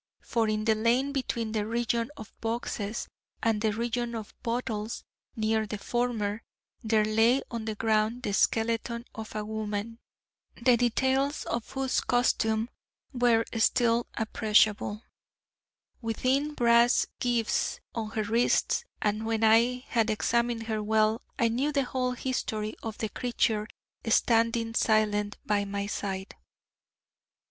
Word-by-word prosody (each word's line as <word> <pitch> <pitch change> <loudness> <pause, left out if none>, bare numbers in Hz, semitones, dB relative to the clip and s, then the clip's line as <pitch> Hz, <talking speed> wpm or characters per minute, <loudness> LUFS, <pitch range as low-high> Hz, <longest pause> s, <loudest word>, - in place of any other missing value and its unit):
For 225 -2 0
in 215 0 -1
the 225 - +4
lane 235 +5 +2
between 240 -5 -2
the 215 -1 0
region 235 0 0
of 215 - -10
boxes 225 -1 -3 0.4
and 225 -2 +2
the 220 -1 +2
region 235 +2 -2
of 220 -2 -7
bottles, 230 -2 -3 0.3
near 220 0 +1
the 210 - -4
former, 225 -2 -1 0.4
there 220 -1 +3
lay 225 +5 +3
on 230 -2 -4
the 220 -1 -3
ground 220 +2 +1
the 205 - -2
skeleton 230 +2 +1
of 220 -1 -8
a 210 0 -2
woman, 215 +1 -4 0.6
the 245 +1 +5
details 265 +4 +1
of 235 -1 -3
whose 265 -1 0
costume 225 -2 +1 0.5
were 240 -2 +3
still 230 +1 +2
appreciable, 215 -1 +2 1.0
with 225 -2 -4
thin 280 +4 +1
brass 235 -1 +4
gyves 240 -2 0 0.2
on 220 -2 -3
her 220 0 -2
wrists: 230 +4 +2 0.2
and 215 +1 0
when 225 0 0
I 235 +3 +4
had 225 -2 +1
examined 235 +2 +1
her 220 -1 -2
well, 215 +1 +2 0.2
I 230 - +3
knew 255 +6 0
the 280 -2 +1
whole 255 0 -1
history 220 -4 -3
of 225 -1 -5
the 220 - -2
creature 220 -2 0 0.4
standing 230 0 +2
silent 210 -2 +2
by 205 -1 +1
my 200 0 -3
side. 195 -1 -4
225 Hz, 135 wpm, -28 LUFS, 215-240 Hz, 1.0 s, the